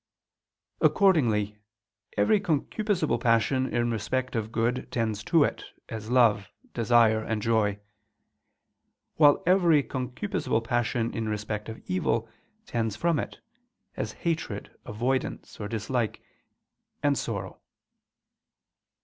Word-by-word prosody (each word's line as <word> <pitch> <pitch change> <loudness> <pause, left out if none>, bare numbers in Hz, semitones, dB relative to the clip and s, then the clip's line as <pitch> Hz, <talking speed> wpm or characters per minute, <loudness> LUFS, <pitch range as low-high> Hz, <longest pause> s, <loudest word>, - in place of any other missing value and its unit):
Accordingly 110 - +3 0.6
every 105 - +4
concupiscible 200 +3 0
passion 125 +2 +2
in 120 0 +1
respect 130 +4 -2
of 110 -1 -2
good, 120 +2 -1
tends 110 -3 -1
to 165 -4 +4
it, - - -2 0.3
as 110 0 -6
love, 115 -6 +3 0.2
desire 115 -2 +4
and 110 -1 -2
joy; 105 -2 +1 1.4
while 145 -2 +5
every 170 -5 +4
concupiscible 130 - -2
passion 120 0 0
in 110 -1 -2
respect 105 0 -3
of 110 - -9
evil, 110 +5 0 0.4
tends 115 - -2
from 165 +5 +1
it, - - -6 0.5
as - - -3
hatred, 160 -11 -3
avoidance 125 +5 -2
or 105 - -4
dislike, 115 +1 -2 0.8
and 145 -1 +3
sorrow. 100 -7 -4
115 Hz, 105 wpm, -27 LUFS, 110-135 Hz, 1.4 s, while